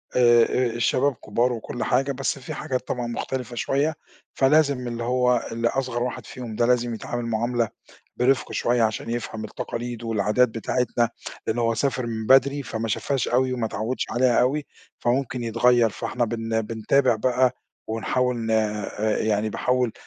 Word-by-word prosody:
آآ 120 +1 +5
الشباب 130 +4 +2
كبار 120 +4 0
وكل 115 +1 -5
حاجة، 135 +3 +1
بس 135 +1 -2
في 130 - -7
حاجات 130 -1 -3
طبعًا 120 -1 -2
مُختلفة 125 +1 -4
شوية، 140 +6 0 0.4
فلازم 140 -2 +3
اللي 120 0 -4
هو 125 0 +2
اللي 115 +1 0
أصغر 125 -2 -1
واحد 125 - -4
فيهم 120 -4 -7
ده 120 - +2
لازم 120 -1 +2
يتعامل 120 +2 -4
معاملة 115 0 0 0.5
برفق 130 +2 +2
شوية 120 -1 +1
عشان 110 +1 -1
يفهم 110 -2 -4
التقاليد 120 +1 -5
والعادات 115 +3 +2
بتاعتنا، 120 +1 0 0.4
لأن 110 +2 -1
هو 115 -1 +2
سافر 130 0 -1
من 110 -1 -4
بدري، 140 +2 +5
فما 115 -2 -4
شافهاش 135 +4 -1
أوي 130 +1 +2
وما 120 -3 -1
اتعودش 110 +4 -2
عليها 120 -1 +3
أوي، 140 +4 +1 0.3
فممكن 125 0 0
يتغيّر. 115 0 +3
فإحنا 120 +5 -2
بن 115 0 -1
بنتابع 115 +4 +2
بقى، 125 +2 +2 0.3
ونحاول 125 +3 0
ن 115 -1 -3
آآ 105 -1 0
يعني 110 0 0
باحاول 125 +1 0
120 Hz, 155 wpm, -24 LUFS, 115-125 Hz, 0.5 s, آآ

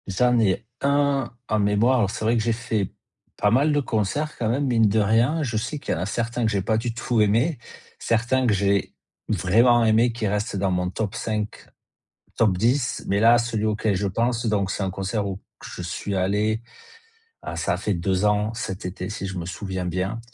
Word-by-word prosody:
J'en 125 +5 +2
ai 105 0 +1 0.2
1 140 -2 +1 0.2
en 110 -1 +1
mémoire, 105 +5 +3
alors 100 -4 +2
c'est 110 - -4
vrai 115 +2 +3
que - - +1
j'ai 115 +1 +1
fait 110 -4 -2 0.5
pas 105 - +2
mal 140 +6 +3
de 145 - +2
concerts 140 +5 -1
quand 110 - -1
même, 135 +5 0
mine 115 -4 +3
de 110 +2 +2
rien, 115 +10 +2
je 120 -5 -2
sais 125 +7 -3
qu'il - - -2
y - - -2
en - - -3
a - - -1
certains 120 +2 -2
que 110 - +1
j'ai 100 -2 0
pas 110 +3 +1
du 115 +1 -2
tout 120 -1 0
aimé, 115 +8 +2 0.4
certains 120 +3 +1
que 110 - +3
j'ai 100 0 0 0.3
vraiment 115 +5 +4
aimé 115 +2 +4
qui 115 -2 -2
reste 105 +1 -2
dans 95 -1 0
mon 90 0 0
top 100 +1 -3
5, 105 -1 -4 0.7
top 100 -5 +2
10, 120 +6 +1
mais 100 +1 +1
là, 115 +2 +7
celui 115 -2 -1
auquel 110 -1 0
je 100 +2 -1
pense, 115 +4 0
donc 100 -3 +1
c'est 105 - -2
un 95 - -1
concert 95 +3 -2
où 95 -1 -4 0.2
que - - -10
je - - -7
suis 90 +3 -4
allé, 105 +4 0 0.8
ah, - - -6
ça - - 0
a - - -1
fait 105 - -1
2 95 +3 0
ans 105 +1 +1
cet 95 -4 -5
été 90 0 -5
si 105 -2 -5
je 95 -1 -5
me 85 - -4
souviens 95 0 -4
bien, 95 +5 -2
110 Hz, 220 wpm, -24 LUFS, 100-120 Hz, 0.8 s, là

